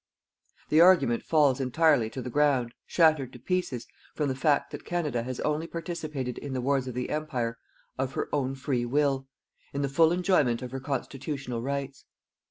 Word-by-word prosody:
The 155 +2 +5
argument 170 -10 +5
falls 145 -5 +3
entirely 135 -2 +3
to 130 +2 -6
the 125 - -5
ground, 135 -4 +2
shattered 155 -6 +3
to - - -11
pieces, 180 -10 -2 0.3
from 150 -2 0
the 130 - -1
fact 145 +2 +1
that - - -7
Canada 150 -9 -1
has 125 +1 -5
only 150 +2 -1
participated 155 -7 -4
in 140 -2 -6
the 130 - -1
wars 135 0 0
of 125 - -5
the 125 0 -3
Empire 125 -7 -2 0.4
of 135 0 -1
her - - -2
own 135 -2 0
free 130 -2 -1
will, 135 +1 +1 0.5
in 140 0 -1
the 140 - 0
full 160 +4 +4
enjoyment 175 -10 +2
of 125 - -6
her 135 - -4
constitutional 135 -2 -4
rights. 140 +1 -4
140 Hz, 180 wpm, -28 LUFS, 125-155 Hz, 0.5 s, The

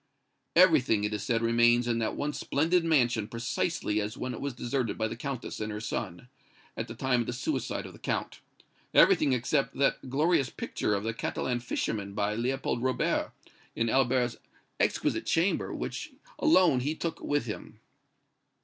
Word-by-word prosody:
"Everything, 155 - +5
it 105 +1 -1
is 105 - -2
said, 115 +1 0
remains 120 +1 +4
in 115 -1 +1
that 110 - -1
once 145 +1 -3
splendid 165 +4 +2
mansion 120 -9 +2
precisely 115 0 -1
as 105 +4 -4
when 125 0 -3
it - - -7
was 140 -3 -3
deserted 120 -1 -2
by 110 - 0
the - - -5
Countess 130 +1 -5
and 110 0 -3
her 105 - -4
son, 95 -1 -4 0.5
at - - -4
the - - -8
time 125 -2 +1
of 115 - -4
the 125 - -2
suicide 125 - -2
of - - -9
the - - -14
Count - - -3 0.6
everything 140 - +6
except 130 +3 0
that 135 -1 0
glorious 145 0 +2
picture 105 - -2
of 100 - -2
the 115 +1 -2
Catalan 120 +2 -2
fisherman 105 -4 -3
by 105 0 0
Leopold 120 +1 -1
Robert, 130 0 0 0.4
in 115 0 0
Albert's 125 -2 +2 0.4
exquisite - - 0
chamber, 170 +4 +1
which - - -5 0.3
alone 185 - +5
he 145 +5 -1
took 165 0 -3
with 145 -4 -1
him." 105 - -7
125 Hz, 170 wpm, -29 LUFS, 115-140 Hz, 0.6 s, everything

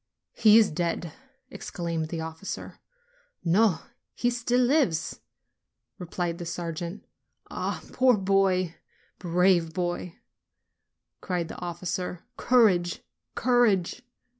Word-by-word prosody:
"He 220 -2 +6
is 220 -3 +5
dead!" 170 0 -2 0.4
exclaimed 170 -8 -4
the 165 -1 -4
officer. 160 +4 -7 0.7
"No, 180 0 +3 0.3
he 245 - +1
still 245 +1 +1
lives 240 - +1 0.4
!" - - -58
replied 175 -1 -3
the 175 - -5
sergeant. 170 +3 -5 0.5
"Ah, - - -3
poor 255 -3 +4
boy! 190 -3 +2 0.5
brave 175 -1 +2
boy!" 175 -1 -3 1.1
cried 175 -3 -2
the - - -8
officer. 180 0 -4
"Courage, 195 -10 +3 0.3
courage!" 240 -5 +2
180 Hz, 100 wpm, -27 LUFS, 170-215 Hz, 1.1 s, He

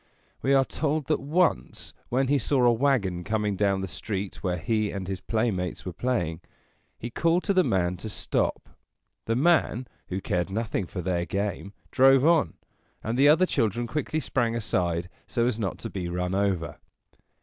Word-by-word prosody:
We 135 +1 +3
are 135 -1 +4
told 155 0 -1
that 155 - +2
once, 160 +5 0 0.2
when 130 +2 +1
he 140 +1 +3
saw 130 +1 +1
a 120 - +6
wagon 115 -9 +1
coming 105 0 -1
down 100 -1 +1
the 95 - -3
street 95 +4 -5
where 90 -1 -1
he 105 +5 0
and 95 -2 -5
his 95 -2 -4
playmates 110 -6 -1
were 90 - -4
playing, 90 -8 -1 0.6
he 120 - -6
called 170 +7 +2
to 200 - +1
the 185 -1 +4
man 90 - 0
to 110 +5 -6
stop. - - -2 0.6
The 115 - 0
man, 140 -4 +2 0.2
who 95 - -3
cared 90 -1 -1
nothing 110 -2 -2
for 90 - -5
their 85 -1 -1
game, 100 0 -3 0.2
drove 135 +1 +5
on, 165 -2 +3 0.5
and 110 +2 -2
the 140 +3 +5
other 165 +5 +5
children 120 - 0
quickly 155 +5 -2
sprang 120 -6 0
aside 90 -6 -1 0.2
so 120 -2 0
as 120 -2 0
not 100 -4 -2
to - - -6
be 90 -3 -4
run 90 +1 -2
over. 95 -4 -1
110 Hz, 180 wpm, -26 LUFS, 95-135 Hz, 0.6 s, a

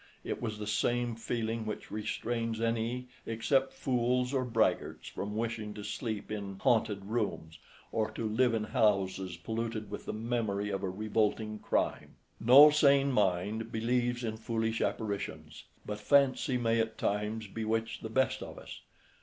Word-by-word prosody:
It - - -4
was 110 -3 -3
the 105 - -5
same 120 +2 0
feeling 115 0 -2
which 110 -1 -6
restrains 115 +1 -2
any 115 +2 -1 0.2
except 130 +4 +1
fools 125 0 0
or 130 -2 +2
braggarts 110 -7 0
from 105 +1 -5
wishing 110 -2 -3
to 105 - -7
sleep 110 0 -4
in 100 -2 -4
"haunted" 105 -2 +1
rooms, 100 -8 -3 0.3
or 110 -1 0
to 115 - -2
live 115 +2 +2
in 110 - 0
houses 95 -4 +1
polluted 110 +2 -4
with 105 - -6
the - - -1
memory 110 -3 -1
of 95 -1 -2
a 95 - -1
revolting 110 +2 -1
crime. - - -1 0.2
No 140 +6 +9
sane 140 -2 +4
mind 105 +1 0
believes 120 +2 0
in 110 -1 -2
foolish 115 0 -1
apparitions, 100 -8 -3 0.2
but 105 0 -4
fancy 135 -1 +3
may 115 -1 +1
at 110 0 -1
times 105 +2 -1
bewitch 110 +2 -2
the 110 - -5
best 130 +4 +1
of - - -8
us. - - -10
110 Hz, 155 wpm, -31 LUFS, 105-120 Hz, 0.3 s, No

